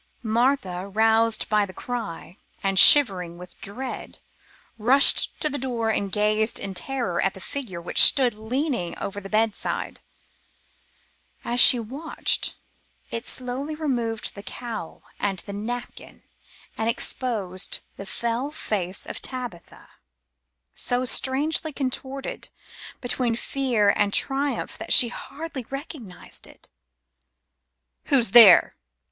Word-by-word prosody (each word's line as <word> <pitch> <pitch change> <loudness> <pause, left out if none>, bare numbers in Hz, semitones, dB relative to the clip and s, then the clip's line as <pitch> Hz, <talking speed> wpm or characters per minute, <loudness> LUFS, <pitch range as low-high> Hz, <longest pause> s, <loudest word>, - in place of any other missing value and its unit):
Martha, 220 -5 0
roused 225 +2 +2
by 210 -1 +2
the 185 -2 -7
cry, 225 -8 -6 0.3
and 195 -1 +3
shivering 180 -8 +7
with 180 +1 -14
dread, 250 +6 -7 0.6
rushed 260 +6 +4
to 305 - -1
the 285 -1 -3
door 235 -3 -2
and 200 -2 -2
gazed 215 +2 0
in 195 - -5
terror 215 -2 -3
at 195 - 0
the - - -10
figure 210 -5 -6
which 170 - +1
stood 255 -4 +6
leaning 230 - -3
over 200 +1 -6
the 195 - -10
bedside. 215 0 -2 1.4
As 240 +1 -2
she 245 - +10
watched, 270 +8 -3 0.6
it 230 +1 -5
slowly 260 +4 -5
removed 240 -8 -3
the 200 - -10
cowl 220 -4 -8 0.2
and 195 -2 -2
the 200 - -7
napkin 240 +4 -7 0.6
and 225 +1 0
exposed 210 -6 -1
the 195 - -9
fell 235 +6 -3
face 200 - -3
of - - -7
Tabitha, 245 -9 -8 0.9
so 245 +1 -2
strangely 290 +5 0
contorted 270 0 -5 0.5
between 245 -2 -1
fear 235 -5 0
and 205 -1 +1
triumph 275 +5 -1
that - - +1
she 240 - +9
hardly 275 -1 -8
recognized 275 - -9
it. - - -13 1.4
"Who's 245 -7 +2
there?" 215 -6 +8
230 Hz, 120 wpm, -24 LUFS, 200-265 Hz, 1.4 s, she